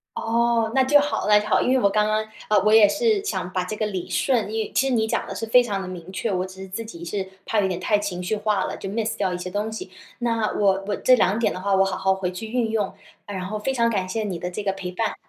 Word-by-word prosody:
哦， 230 0 +1
那 265 - +5
就 290 +3 +5
好 290 -6 -1
那 210 0 +7
就 210 - -5
好， - - +3
因 - - +1
为 260 - +4
我 200 - +3
刚 210 +1 +2
刚， 215 0 0 0.2
呃， 210 -2 +5
我 215 - +5
也 215 -2 +8
是 415 - +1
想 290 - -3
把 185 - 0
这 180 +4 -5
个 215 0 -1
理 185 -4 -5
顺， 235 -6 +1
因 220 0 -1
为 - - -9
其 270 - +2
实 265 - 0
你 220 -2 +2
讲 - - -1
的 - - -5
是 225 - -3
非 245 +3 +6
常 200 -4 -2
地 190 - -6
明 180 0 -8
确， 210 +3 -2
我 185 -1 0
只 190 0 -11
是 190 - -7
自 190 +5 -5
己 170 -6 -9
是 190 +2 -3 0.2
怕 215 -2 +1
有 190 - +1
点 180 -2 -3
太 210 +3 +2
情 185 -3 -4
绪 200 +4 -1
化 210 -2 0
了， - - -4
就 195 - -6
miss 220 +2 -2
掉 190 -3 0
一 - - -2
些 180 +1 -5
东 210 +3 -2
西。 220 - -7 0.3
那 230 -3 0
我 195 -1 +2
我 205 - 0
这 255 - +5
两 200 -2 +2
点 230 - +1
的 185 - -6
话 200 0 0
我 195 0 +4
好 190 -1 -2
好 190 0 +2
回 190 -1 -3
去 185 +5 -6
运 230 -1 -1
用， 210 -3 -1 0.3
然 190 -2 -4
后 210 +3 -3
非 265 +5 -1
常 235 -2 +2
感 195 -5 -1
谢 220 +2 -2
你 190 -4 -3
的 180 - -3
这 205 +4 -5
个 195 -1 0
陪 190 -2 -6
伴。 225 +5 -2
210 Hz, 340 characters per minute, -23 LUFS, 190-225 Hz, 0.3 s, 也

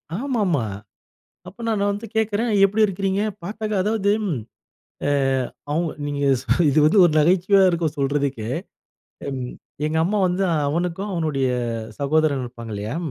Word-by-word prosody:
ஆமாமா! 205 - 0 0.8
அப்ப 230 +5 -10
நான் 205 -3 +1
வந்து 205 +3 -5
கேட்கிறேன், 220 +1 +1 0.2
எப்பிடி 210 +3 +2
இருக்கிறீங்க? 195 +1 -1 0.2
பார்த்தாக்க 215 +2 -4
அதாவது 210 -1 +1 0.9
ஏ - - +2 0.6
அவங்க 165 +2 0 0.2
நீங்க 145 -1 -3 0.5
இது 145 +1 +2
வந்து 155 - +4
ஒரு 165 - +3
நகைச்சுவையா 185 +5 +4
இருக்கும் 165 -3 -1
சொல்றதுக்கே! 140 -4 -1 0.8
ம், 130 -2 -4 0.3
எங்க 160 +1 0
அம்மா 205 +4 0
வந்து 180 +2 0
அ, - - +2
அவனுக்கு 175 +4 -1
அவனுடைய 150 -6 0 0.5
சகோதரன் 145 -1 +1
இருப்பாங்க 115 -2 -8
இல்லயா! 105 +8 -4
170 Hz, 130 wpm, -22 LUFS, 145-205 Hz, 0.9 s, வந்து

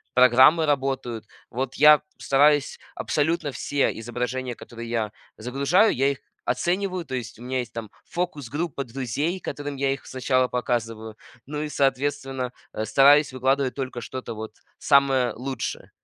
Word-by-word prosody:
программы 130 +6 +6
работают. 135 -5 -1 0.2
Вот 130 +2 -3
я 150 0 +7 0.2
стараюсь 145 +1 +3 0.2
абсолютно 155 0 0
все 140 +1 -1
изображения, 125 +2 -3
которые 115 0 -9
я 110 -3 -1 0.3
загружаю, 140 - +2
я 135 +2 +2
их 140 - -6 0.3
оцениваю. 180 +6 -1
То 130 - -4
есть 120 -2 -6
у 120 - -10
меня 130 +1 -2
есть 120 -2 -5
там 115 -2 -6 0.2
фокус-группа 150 -3 -3
друзей, 135 +8 -3
которым 145 -4 -5
я 135 0 +1
их 135 - -9
сначала 130 0 +1
показываю. 115 -3 -3 0.3
Ну 150 +1 -4
и, 155 - -4
соответственно, 135 -2 -1 0.2
э, 110 - -3
стараюсь 140 +4 +5
выкладывать 130 +1 +1
только 130 -3 -4
что-то 125 -2 -6
вот 110 0 -7 0.2
самое 135 -3 +3
лучшее. 130 +3 -5
130 Hz, 140 wpm, -24 LUFS, 125-145 Hz, 0.3 s, я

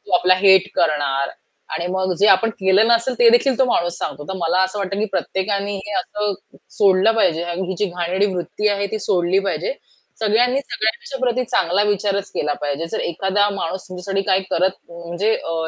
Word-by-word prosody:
तो 195 - -9
आपला 185 +1 +4
हेट 190 -1 +5
करणार 140 -4 +1 0.5
आणि 170 - -3
मग 190 -1 0
जे 205 - +4
आपण 225 +4 +2
केलं 190 +3 +4
नसेल 235 +2 +2
ते 240 -1 +6
देखील 245 +2 +3
तो 265 - +5
माणूस 175 -7 0
सांगतो. 145 - -5
तर - - -3
मला 175 +3 +2
असं 190 +2 -4
वाटतं 195 0 -3
की - - +1
प्रत्येकानी 200 +1 -2
हे 210 - -6
असं 210 -3 -3 0.4
सोडलं 195 +2 +4
पाहिजे 165 -6 +2
आणि 175 +2 -3
ही 190 - -2
जी 210 - +1
घाणेरडी 180 +2 -1
वृत्ती 195 +4 -2
आहे 200 -1 0
ती 215 - -1
सोडली 180 +1 +2
पाहिजे. - - -2 0.5
सगळ्यांनी 245 +5 +2
सगळ्यांच्या 235 +2 -3
प्रती 250 +1 0
चांगला 190 -1 +1
विचारच 200 -1 -1
केला 150 0 -1
पाहिजे. 145 +3 -2
जर - - -1
एखादा 195 +4 +1
माणूस 185 +3 -4
तुमच्यासाठी 190 +2 -3
काय 190 0 +4
करत 185 +2 +1
म्हणजे 175 +6 -2
अ, 165 - -5
190 Hz, 190 wpm, -20 LUFS, 175-210 Hz, 0.5 s, ते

